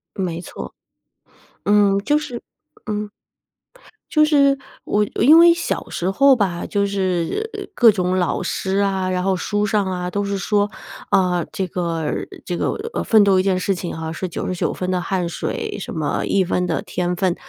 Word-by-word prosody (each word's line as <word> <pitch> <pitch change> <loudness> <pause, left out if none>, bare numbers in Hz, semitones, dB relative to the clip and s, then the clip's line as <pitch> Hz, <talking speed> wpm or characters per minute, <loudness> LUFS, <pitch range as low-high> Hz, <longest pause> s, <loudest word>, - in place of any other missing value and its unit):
没 175 -3 -3
错。 - - -8 0.9
嗯， 205 -1 +4
就 295 +9 +2
是 250 -6 -6 0.4
嗯。 210 -1 -3 1.0
就 305 -1 +4
是 280 -2 +4 0.3
我 210 0 +1
我 - - +1
因 305 +6 +8
为 340 0 +8
小 340 - -3
时 180 +2 -2
候 275 +6 +5
吧， 180 -5 -1
就 200 -1 0
是 195 - -2
各 235 -3 +7
种 185 -2 0
老 175 - 0
师 190 0 -2
啊， 190 -2 0
然 180 0 -1
后 195 -1 +2
书 205 +3 -1
上 205 -1 +1
啊， 180 -1 -3
都 205 +1 -1
是 200 0 -2
说， 205 +2 +1 0.4
啊， 180 -2 +2
这 190 - -2
个 165 -3 -2 0.4
这 175 - -3
个， - - 0 0.2
呃， - - -2
奋 215 -2 +5
斗 190 -2 +4
一 - - +2
件 190 -1 +1
事 190 +2 0
情 175 -2 -5
哈， 160 0 -4
是 185 +3 -4
99 180 +1 -2
分 185 0 -3
的 180 -1 0
汗 180 -1 -1
水， 170 - -4
什 - - -6
么 155 -2 -1
1 195 -2 +2
分 180 0 0
的 165 - -1
天 180 0 -2
份。 185 -1 +1
190 Hz, 190 characters per minute, -20 LUFS, 180-210 Hz, 1.0 s, 因